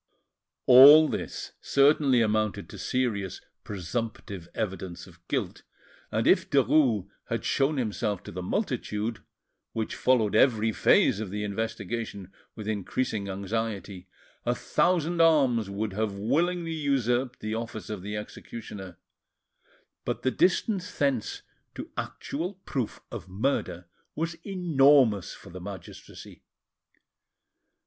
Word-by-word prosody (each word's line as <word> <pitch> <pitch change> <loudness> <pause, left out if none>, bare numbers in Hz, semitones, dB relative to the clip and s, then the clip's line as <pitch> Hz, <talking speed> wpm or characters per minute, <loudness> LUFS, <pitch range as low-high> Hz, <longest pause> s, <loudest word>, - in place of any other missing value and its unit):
All 145 +5 +10
this - - -5
certainly 140 -3 +4
amounted 110 -1 0
to - - -10
serious 105 -8 -1 0.2
presumptive 100 -2 -5
evidence 95 -4 -4
of - - -17
guilt, - - -2 0.5
and - - 0
if - - +4
Derues 130 -8 +3 0.2
had 115 - -3
shown 140 +2 +1
himself 105 -4 -2
to - - -9
the 90 - -5
multitude, 115 - -2 0.5
which 110 -1 -3
followed 115 -5 +2
every 110 -2 +4
phase 105 - +4
of 110 -3 -4
the 105 +2 -3
investigation 105 -2 -4 0.2
with 105 -1 -7
increasing 110 0 -2
anxiety, 100 -1 -4 0.4
a 120 - 0
thousand 170 +3 +1
arms 135 -10 +4
would 100 +1 -3
have 105 -1 -2
willingly 165 - 0
usurped 130 -4 0
the 110 0 -4
office 110 -1 -5
of 105 -3 -5
the 105 +2 -4
executioner; 105 -3 -8 1.1
but - - -3
the 130 - +2
distance 185 - +1
thence 135 -6 -1 0.3
to - - -7
actual 175 +7 -4
proof 125 -5 -3
of - - -7
murder 95 -4 -2 0.3
was 165 +1 -2
enormous 140 - +3
for - - -14
the 90 +1 -8
magistracy. 95 -2 -10
115 Hz, 120 wpm, -27 LUFS, 100-140 Hz, 1.1 s, All